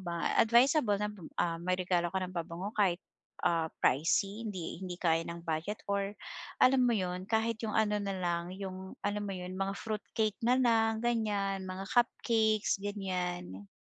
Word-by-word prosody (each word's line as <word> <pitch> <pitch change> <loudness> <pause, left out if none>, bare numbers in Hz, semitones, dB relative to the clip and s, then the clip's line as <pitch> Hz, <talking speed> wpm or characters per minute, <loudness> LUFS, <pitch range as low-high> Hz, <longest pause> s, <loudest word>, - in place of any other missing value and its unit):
ba 170 -2 -2
advisable 235 -1 +5
na, 210 - 0 0.3
ah, 165 -1 +1
may 185 +1 0
regalo 175 -1 +1
ka 190 - +1
ng 185 0 -4
pabango 170 +3 -4
kahit, 190 -4 +2 0.5
ah, 165 -1 +2
pricey, 195 - +2
hindi 185 -4 -5
hindi 180 -1 -5
kaya 165 -2 +3
ng 170 0 -7
budget 165 +6 -2
or, 200 0 0 0.5
alam 255 0 +6
mo 245 - +4
yun, 185 -1 -2
kahit 225 0 +1
yung 215 - -2
ano 210 -1 +3
nalang, 180 -3 -2
yung 190 -1 -6
alam 205 0 -1
mo 200 - -3
yun, 180 0 -6
mga 195 0 -1
fruitcake 215 -1 -2
nalang, 230 -3 +3
ganiyan, 205 -5 0
mga 185 +1 -5
cupcakes, 225 -4 +2
ganiyan. 180 - -3
195 Hz, 155 wpm, -32 LUFS, 180-220 Hz, 0.5 s, alam